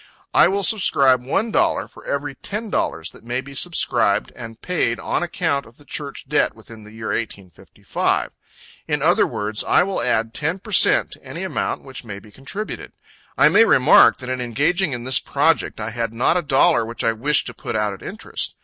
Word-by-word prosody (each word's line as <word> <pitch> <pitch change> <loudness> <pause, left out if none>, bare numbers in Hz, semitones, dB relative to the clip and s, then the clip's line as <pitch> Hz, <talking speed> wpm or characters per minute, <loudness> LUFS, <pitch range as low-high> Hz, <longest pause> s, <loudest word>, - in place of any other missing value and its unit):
I - - +6
will 200 +2 -1
subscribe 135 - +3
one 205 - -1
dollar - - +1
for - - -16
every 140 0 -2
ten 210 - -6
dollars 80 - -2
that - - -17
may 120 +2 -2
be 140 +1 -9
subscribed 170 +5 +1
and 115 -1 -10
paid 165 -10 -1
on - - -2
account 165 -5 -1
of 115 - -18
the 145 - -19
Church 140 -2 -5
debt 150 - +1
within 110 -1 -14
the 105 - -13
year 110 0 -6
1855. 100 -5 -3 0.6
In - - -1
other - - +4
words, 105 +1 -2
I - - +4
will 195 +1 -2
add 115 +1 0
ten 160 +7 -1
per 210 +3 -12
cent 190 - +4
to - - -8
any - - -7
amount - - -3
which 135 -2 -9
may 100 -4 -7
be 105 +1 -15
contributed. 165 - -6 0.4
I - - +6
may 225 - +6
remark, 145 - +6
that 125 -1 -7
in 130 -1 -2
engaging 145 +8 0
in 120 -1 -5
this 130 +1 +2
project, 150 -1 0
I 110 +1 -4
had 115 -1 -3
not 125 +8 +2
a 180 - +2
dollar 145 0 +3
which 115 +1 -5
I 115 - +3
wished 135 +7 0
to 120 - -4
put 110 - -6
out 105 -1 0
at 95 - -11
interest. 215 +3 -4
130 Hz, 205 wpm, -21 LUFS, 115-165 Hz, 0.6 s, I